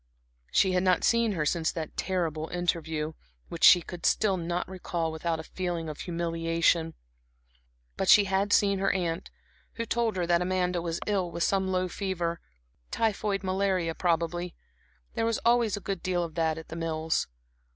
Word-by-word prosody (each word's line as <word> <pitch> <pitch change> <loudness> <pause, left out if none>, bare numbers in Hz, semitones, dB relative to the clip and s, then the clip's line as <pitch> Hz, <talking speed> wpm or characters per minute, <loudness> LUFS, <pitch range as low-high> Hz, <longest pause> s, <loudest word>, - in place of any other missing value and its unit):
She 190 - +3
had 180 0 +2
not 185 -1 +2
seen 230 -2 +3
her 155 -5 -1
since 160 +1 +1
that 160 -2 -6
terrible 165 -4 -2
interview, 160 -3 -2 0.4
which - - -6
she 175 -2 +8 0.2
still 200 +1 +2
could 170 - -5
not 175 +1 -1
recall 175 -3 -3
without 160 +1 -2
a - - -5
feeling 175 -1 -4
of 150 - -7
humiliation; 165 -1 0 1.0
but 190 - 0
she 210 - +8
had 195 +1 0
seen 200 -2 +3
her 195 0 +2
aunt, 175 -1 -2 0.4
who 230 - -3
told 230 -1 0
her 180 -2 0
that 170 0 +2
Amanda 180 -1 0
was 165 -1 -3
ill 195 -4 0
with 170 - -2
some 190 -1 +1
low 185 -1 0
fever 175 -3 -3 0.5
typhoid 210 -3 0
malaria, 185 -3 0
probably; 170 0 -1 0.6
there - - -1
was 230 - +1
always 235 -3 +3
a - - -4
good 195 -3 -4
deal 180 -1 0
of 165 -2 -6
that 160 -1 0
at 160 - -9
The 160 - -6
Mills. 160 -1 -1
175 Hz, 170 wpm, -28 LUFS, 165-190 Hz, 1.0 s, she